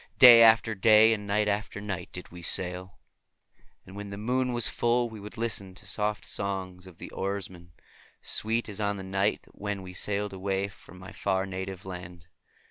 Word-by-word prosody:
Day 120 -4 +10
after 115 0 +6
day 110 +2 +6
and 105 -2 -5
night 105 +1 +1
after 105 0 -2
night 100 -4 -5
did 90 - -8
we 90 0 -10
sail, 90 +1 0 0.9
and 95 - -12
when 100 0 -7
the 100 - -7
moon 125 +4 0
was 120 -1 +2
full 120 0 +1
we 110 -2 -10
would 105 +3 -10
listen 105 -5 -3
to 100 - -11
soft 105 +1 -2
songs 95 -2 -3
of 90 - -14
the - - -9
oarsmen, 95 -3 -5 0.5
sweet 115 +2 -1
as 105 -1 -5
on 100 0 0
that 95 - -7
distant 95 0 -9
night 100 +2 +1
when 100 -1 -5
we 90 0 -9
sailed 105 +2 -1
away 95 +1 -2
from 90 -1 -16
my 95 +1 -11
far 95 -1 -1
native 95 -1 -6
land. 90 -2 -9
100 Hz, 190 wpm, -28 LUFS, 95-105 Hz, 0.9 s, Day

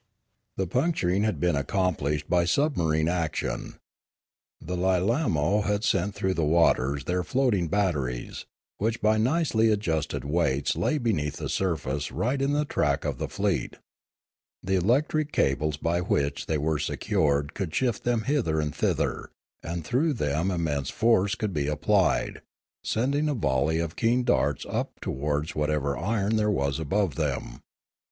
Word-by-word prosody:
The 95 - 0
puncturing 100 - +1
had 110 - -1
been 90 -3 +2
accomplished 75 -2 -1
by 90 -1 +3
submarine 85 - +1
action. 80 -8 -2 0.8
The 90 +3 -5
Lilaino 95 - +1
had 105 +1 0
sent 100 -1 +1
through 95 0 0
the 85 - -1
waters 70 -3 +2
their 90 +3 0
floating 120 -7 +1
batteries, 75 -11 -2 0.3
which 110 +2 0
by 110 +1 +3
nicely 120 -3 +2
adjusted 80 -9 -1
weights 70 -3 +1
lay 155 - +1
beneath 85 - -1
the - - -4
surface 70 -6 -1
right 135 +4 -1
on 140 +1 +1
the 150 +1 +1
track 75 - 0
of - - -2
the - - -2
fleet. - - -1 0.9
The 95 - -1
electric 140 - +1
cables 75 +2 +1
by 85 +3 0
which 70 -5 -1
they 80 - 0
were 75 +1 0
secured 70 -1 0
could 95 -6 -3
shift 120 +4 0
them 120 -2 +1
hither 120 - 0
and 75 -2 -2
thither; - - -1 0.3
and 85 -1 -5
through 145 - +1
them 80 - 0
im 90 -3 -1
mense 70 -4 -1
force 105 -4 +2
could 105 -3 -3
be 75 -3 -1
applied, 90 +6 +1 0.4
sending 140 +6 0
a 145 - 0
volley 75 - +1
of 85 -1 -2
keen 120 +2 +2
darts 75 - +1
up - - -3
towards 75 +3 -2
whatever 75 -2 0
iron 105 +3 0
there 105 0 +2
was 70 -8 0
above 90 +2 0
them. - - -3
90 Hz, 150 wpm, -26 LUFS, 75-110 Hz, 0.9 s, by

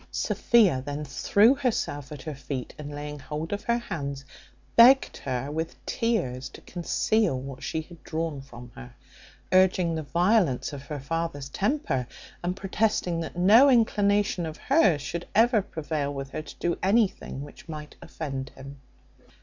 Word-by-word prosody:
Sophia 200 - +3
then 145 +2 -4
threw 200 - +4
herself 215 - -2
at 145 -3 -8
her 155 - -5
feet, 130 -1 -6
and 150 -1 -6
laying 150 0 -6
hold 150 +6 -5
of 205 - -4
her 235 0 +2
hands, 140 - -5 0.5
begged 255 +3 +7
her 135 +1 -3
with 160 +2 -3
tears 175 - -1
to - - -12
conceal 180 -2 0
what 135 0 -8
she 160 - -2
had 170 +1 -15
drawn 160 -3 -3
from 125 -2 -12
her; 125 -2 -11 0.6
urging 185 -2 +4
the 160 - -2
violence 170 - +1
of 140 - -6
her 145 +1 -6
father's 145 -1 -3
temper, 165 - -1 0.4
and 180 +1 -1
protesting 195 -3 0
that 165 +1 -6
no 220 +10 +7
inclinations 205 -6 +2
of 155 - -7
hers 195 - +3
should 170 +1 -5
ever 225 0 +5
prevail 155 -5 -3
with 135 -1 -6
her 155 - -4
to - - -11
do 170 0 -2
anything 195 - +1
which 145 +3 -13
might 150 -1 -7
offend 135 -4 -5
him. 140 +1 -11
160 Hz, 160 wpm, -27 LUFS, 140-200 Hz, 0.6 s, begged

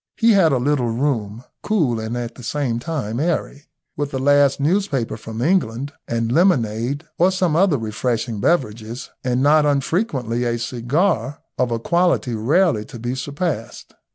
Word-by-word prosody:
He 230 0 +4
had 190 -7 +5
a 135 - +2
little 125 -1 +1
room, 115 -3 -2 0.2
cool 155 - +1
and 110 +2 -4
at 120 -1 -4
the - - -13
same 125 -1 -2
time 125 -5 -3
airy, 150 -3 -2 0.3
with 145 -1 -2
the 135 - -4
last 140 0 +3
newspaper 145 - 0
from 110 +1 -6
England, 140 -5 0
and 115 -1 -1
lemonade, 135 - +1
or 180 +2 +5
some 185 -4 +1
other 175 -3 +3
refreshing 115 0 -2
beverages, 115 -4 -1
and 125 +1 0
not 150 +1 +5
unfrequently 140 - 0
a 120 -1 0
cigar 130 - -1 0.2
of 125 -1 +2
a 115 - -1
quality 170 -1 +1
rarely 125 - +2
to 120 - -10
be 120 +2 -3
surpassed. 140 -1 -4
130 Hz, 155 wpm, -21 LUFS, 115-155 Hz, 0.3 s, had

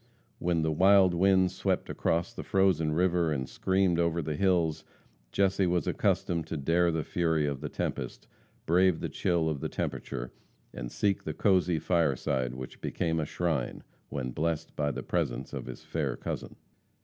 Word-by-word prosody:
When 85 -2 +1
the 80 - +1
wild 95 +3 +5
winds 95 +1 +3
swept - - -1
across 85 +1 -1
the - - -6
frozen 95 -5 +2
river, 85 -1 +2
and 65 -3 -2
screamed 95 -2 +1
over 85 0 +1
the 75 0 -2
hills, 85 -3 +1 0.5
Jesse 95 -1 +2
was 85 -3 +1
accustomed 85 -2 0
to 80 - -3
dare 85 +5 +2
the 80 -1 -1
fury 80 -3 +1
of 70 -2 -3
the 75 - -4
tempest, - - -4 0.4
brave 90 0 +3
the - - -3
chill 85 -2 0
of 75 -3 -1
the - - -3
temperature, 60 0 -4 0.4
and - - -6
seek 100 -2 0
the 80 - -4
cosy 90 -4 +3
fireside 70 -6 0
which 65 0 -8
became 80 -1 -1
a 75 - 0
shrine, 80 -5 -2 0.3
when 65 -3 -3
blessed 80 +3 -2
by 75 -1 0
the - - -4
presence 70 -7 -2
of - - -5
his - - -8
fair - - -2
cousin. - - -5
80 Hz, 170 wpm, -29 LUFS, 75-90 Hz, 0.5 s, wild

